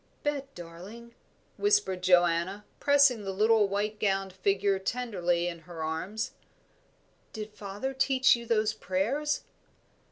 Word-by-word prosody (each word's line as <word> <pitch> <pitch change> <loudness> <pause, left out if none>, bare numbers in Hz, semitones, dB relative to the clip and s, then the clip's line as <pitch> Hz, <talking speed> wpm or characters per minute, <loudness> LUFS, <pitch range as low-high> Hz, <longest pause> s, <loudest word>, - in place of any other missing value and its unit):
"Bet, 280 -2 -3
darling," 185 +8 -11 0.4
whispered 410 - +2
Joanna, 180 +2 +2
pressing 280 -5 +4
the 195 - -3
little 215 +2 +3
white 210 +2 -2
gowned 195 -2 0
figure 195 +1 +1
tenderly 190 -5 -1
in 170 -1 -5
her 165 0 -8
arms, 180 +8 -3 1.0
"did 215 -1 -7
father 205 +7 -5
teach 265 -1 +4
you 235 0 -8
those 215 -1 +2
prayers?" 250 +13 -1
205 Hz, 120 wpm, -29 LUFS, 185-235 Hz, 1.0 s, pressing